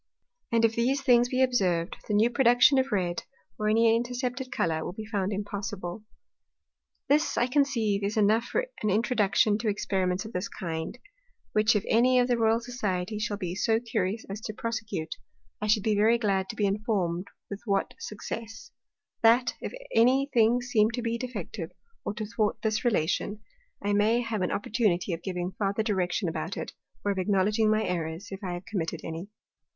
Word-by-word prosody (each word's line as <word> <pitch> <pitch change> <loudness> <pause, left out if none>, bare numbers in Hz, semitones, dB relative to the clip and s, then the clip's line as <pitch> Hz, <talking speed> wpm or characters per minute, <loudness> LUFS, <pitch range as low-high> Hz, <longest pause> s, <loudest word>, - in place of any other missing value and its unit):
And 230 0 +4
if 225 - +2
these 260 +4 +1
things 245 -2 +5
be 255 +1 +2
observed, 185 -9 +1
the 210 - 0
new 225 +3 +4
Production 245 +2 +5
of 265 +1 0
red, 180 -4 0 0.4
or 215 0 +1
any 225 +1 +4
intercepted 245 +2 -2
Colour, 160 -2 0
will - - -5
be 215 +2 -7
found 205 -3 -1
impossible. 200 -1 -4 1.0
This, 300 +3 +2
I 240 - +4
conceive, 240 -7 +1
is 205 +2 -1
enough 215 +3 +3
for - - -1 0.2
an 215 - +1
Introduction 210 -1 +2
to 230 - -2
Experiments 190 -2 0
of 220 - -9
this 180 +2 -2
kind; 160 -2 -5 0.5
which 215 +1 +3
if 210 - 0
any 250 +3 +4
of 245 0 +4
the 245 - +2
Royal 225 0 +3
Society 215 -5 -3
shall 210 -1 -2
be 180 -4 -3
so 220 +3 +2
curious 220 -2 -2
as 200 +2 -6
to 215 -1 -6
prosecute, 215 -9 -4 0.4
I 210 - -1
should 210 -1 +3
be 215 -1 +2
very 220 +3 +4
glad 195 -4 0
to 230 - -5
be 210 - +1
informed 195 -3 -1 0.2
with 200 - -5
what 200 -3 0
success: 220 +1 -7 0.5
That, 235 +2 +5
if - - -4 0.2
any 265 +4 +4
thing 235 +1 +4
seem 220 -3 +3
to 245 - -3
be 230 0 -1
defective, 210 -8 -5 0.3
or 205 - -3
to 215 -1 -3
thwart 215 -1 -1
this 215 -1 0
Relation, 205 -1 0 0.4
I 205 0 +1
may 215 +4 +3
have 225 -4 -2
an 180 - 0
opportunity 205 -4 0
of 165 - -4
giving 180 -1 -3
farther 200 +1 0
Direction 185 -2 0
about 160 +2 -3
it, - - -5 0.3
or 205 - +2
of 195 - -2
acknowledging 205 +3 +2
my 215 0 +2
Errors, 170 +2 -3
if 195 +1 -7
I 180 -2 -3
have 175 +1 -6
committed 190 -8 -3
any. 165 +4 -6
215 Hz, 185 wpm, -28 LUFS, 190-235 Hz, 1.0 s, things